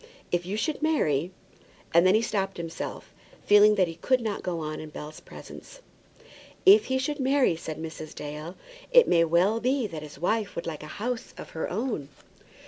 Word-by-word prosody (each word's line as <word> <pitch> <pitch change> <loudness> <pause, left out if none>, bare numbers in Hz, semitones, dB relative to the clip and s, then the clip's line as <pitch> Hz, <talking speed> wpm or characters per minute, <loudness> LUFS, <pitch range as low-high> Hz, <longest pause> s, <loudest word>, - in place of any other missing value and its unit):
If 175 0 0
you 200 +3 -2
should 310 +8 -2
marry 175 - +1 0.3
" - - -28
And 170 +2 +6
then 185 - +5
he 220 - +3
stopped 195 -3 -2
himself, 165 -1 -6 0.3
feeling 210 +1 +7
that 185 -3 +3
he 165 - -5
could 255 +7 +2
not 220 -4 -3
go 175 -2 -3
on 155 0 -4
in 155 - -8
Bell's 150 0 -9
presence. - - -12 0.9
"If 410 +2 +8
he 260 - 0
should 290 +3 -2
marry," 265 -7 +3
said 160 -1 -6
Mrs. 160 -1 -7
Dale, 150 +4 -7 0.4
"it - - +7
may 170 -1 +4
well 175 +7 +2
be 255 +1 +1
that 165 -7 -6
his 150 -1 -10
wife 210 +4 -1
would 170 - -4
like 160 -3 -5
a 155 - -8
house 240 +2 -4
of - - -9
her 160 - -3
own." 210 - -3
190 Hz, 195 wpm, -27 LUFS, 160-240 Hz, 0.9 s, If